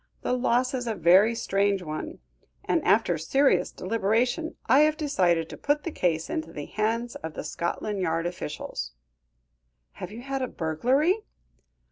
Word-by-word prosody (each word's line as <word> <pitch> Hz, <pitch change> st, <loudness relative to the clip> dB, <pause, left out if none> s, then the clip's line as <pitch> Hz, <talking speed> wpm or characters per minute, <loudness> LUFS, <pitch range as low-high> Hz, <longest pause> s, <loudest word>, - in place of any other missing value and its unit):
The -, -, 0 dB
loss 250 Hz, +1 st, +1 dB
is 250 Hz, -2 st, -2 dB
a 225 Hz, -, -1 dB
very 190 Hz, +6 st, +5 dB
strange 200 Hz, -3 st, +1 dB
one; 160 Hz, -, -5 dB, 0.5 s
and, 330 Hz, -, +1 dB
after 190 Hz, -6 st, +3 dB
serious 270 Hz, -, +2 dB
deliberation, 230 Hz, -, 0 dB
I 260 Hz, +5 st, +5 dB
have 305 Hz, 0 st, +4 dB
decided 180 Hz, -, +1 dB
to -, -, -8 dB
put 290 Hz, +1 st, 0 dB
the 335 Hz, -, -3 dB
case 165 Hz, -, 0 dB
into 160 Hz, +1 st, -4 dB
the 145 Hz, -3 st, -6 dB
hands 230 Hz, +3 st, -1 dB
of 160 Hz, -1 st, -7 dB
the -, -, -4 dB
Scotland 170 Hz, +6 st, -3 dB
Yard 165 Hz, -2 st, 0 dB
officials." 150 Hz, -, -5 dB, 1.0 s
"Have 180 Hz, -, -8 dB
you 235 Hz, +3 st, -9 dB
had 270 Hz, 0 st, -3 dB
a 255 Hz, -, 0 dB
burglary?" 255 Hz, -, +1 dB
215 Hz, 155 wpm, -26 LUFS, 170-260 Hz, 1.0 s, very